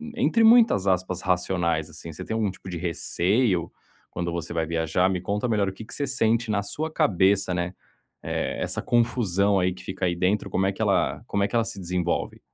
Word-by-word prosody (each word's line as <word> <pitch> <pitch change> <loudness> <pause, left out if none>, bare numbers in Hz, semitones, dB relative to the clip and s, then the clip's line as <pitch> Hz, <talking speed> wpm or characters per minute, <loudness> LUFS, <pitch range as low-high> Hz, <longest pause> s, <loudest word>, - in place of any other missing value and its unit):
entre 235 -2 +2
muitas 225 - +6
aspas, 95 -1 0
racionais, 90 -3 0
assim? 85 +1 -9
Você 80 - -8
tem - - -4
algum 110 -2 0
tipo 95 0 -10
de 90 - -4
receio 90 +3 0 0.4
quando 85 0 -3
você 85 0 -4
vai 80 -1 0
viajar? 85 +3 +1
Me 95 -1 -1
conta 100 +5 -2
melhor 105 -3 +1
o 95 - -3
que 105 - -9
que 110 - -12
você 140 - -2
sente 115 -3 +1
na 105 -1 0
sua 155 +10 -4
cabeça, 100 - +2
né, 90 +1 -2 0.5
eh, - - -2
essa - - -2
confusão 105 -5 +2
aí 90 0 +1
que 90 0 -13
fica 95 0 -3
aí 90 -1 0
dentro, 95 +4 0
como 95 - 0
é 95 - +2
que - - -7
ela - - +1
como 100 - 0
é - - +2
que - - -4
ela 115 - +2
se - - -6
desenvolve? 90 -1 -2
95 Hz, 215 wpm, -25 LUFS, 90-110 Hz, 0.5 s, muitas